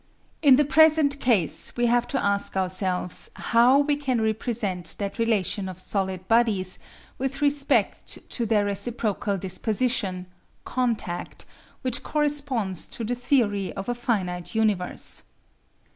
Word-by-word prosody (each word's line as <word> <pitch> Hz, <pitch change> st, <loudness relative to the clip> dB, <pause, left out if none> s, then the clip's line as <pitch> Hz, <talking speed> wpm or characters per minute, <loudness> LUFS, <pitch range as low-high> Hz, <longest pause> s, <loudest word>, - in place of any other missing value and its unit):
In 280 Hz, -4 st, +7 dB
the 295 Hz, +2 st, +3 dB
present 305 Hz, 0 st, +4 dB
case 220 Hz, -, +1 dB
we 240 Hz, -, +2 dB
have 240 Hz, 0 st, +2 dB
to 270 Hz, -, -1 dB
ask 200 Hz, -1 st, 0 dB
ourselves 185 Hz, -1 st, -1 dB
how 245 Hz, +4 st, +4 dB
we 290 Hz, 0 st, +1 dB
can 265 Hz, -4 st, -1 dB
represent 220 Hz, -4 st, -1 dB
that 200 Hz, +2 st, -4 dB
relation 205 Hz, -4 st, 0 dB
of 185 Hz, -, -8 dB
solid 190 Hz, -1 st, -2 dB
bodies 215 Hz, -6 st, +2 dB, 0.4 s
with 270 Hz, +1 st, -2 dB
respect 285 Hz, -1 st, +1 dB
to 235 Hz, -, -1 dB
their 210 Hz, -2 st, +2 dB
reciprocal 205 Hz, 0 st, -1 dB
disposition 195 Hz, 0 st, -1 dB, 0.4 s
(contact) 230 Hz, -8 st, -2 dB, 0.4 s
which 255 Hz, -2 st, -1 dB
corresponds 280 Hz, -, -1 dB
to 230 Hz, -, -5 dB
the 230 Hz, +3 st, -1 dB
theory 240 Hz, -6 st, +1 dB
of 195 Hz, -, -6 dB
a -, -, +1 dB
finite 195 Hz, -6 st, -2 dB
universe. 210 Hz, -5 st, -1 dB
225 Hz, 130 wpm, -25 LUFS, 190-255 Hz, 0.4 s, In